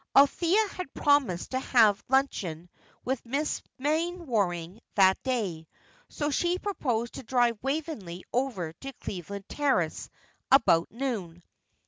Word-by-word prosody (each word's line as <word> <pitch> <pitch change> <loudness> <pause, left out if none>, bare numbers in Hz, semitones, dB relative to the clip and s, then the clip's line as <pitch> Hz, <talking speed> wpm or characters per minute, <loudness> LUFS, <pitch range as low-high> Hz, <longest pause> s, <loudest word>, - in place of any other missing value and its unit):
Althea 345 +9 +5
had 365 -8 -7
promised 280 -12 +2
to 260 - 0
have 220 -6 +4
luncheon 180 - 0 0.3
with 260 -1 -1
Mrs. 280 +6 -1 0.2
Mainwaring 255 - -1
that 190 -2 +5
day, 200 -12 -2 0.4
so 295 0 -2
she 350 +5 +1
proposed 250 - -2
to - - -7
drive 240 -2 +2
Waveney 270 - -3
over 230 -11 -1
to 270 +11 -8
Cleveland 200 -2 -7
Terrace 260 - 0 0.4
about 170 -11 +5
noon. 210 -9 -4
245 Hz, 115 wpm, -28 LUFS, 190-285 Hz, 0.4 s, Althea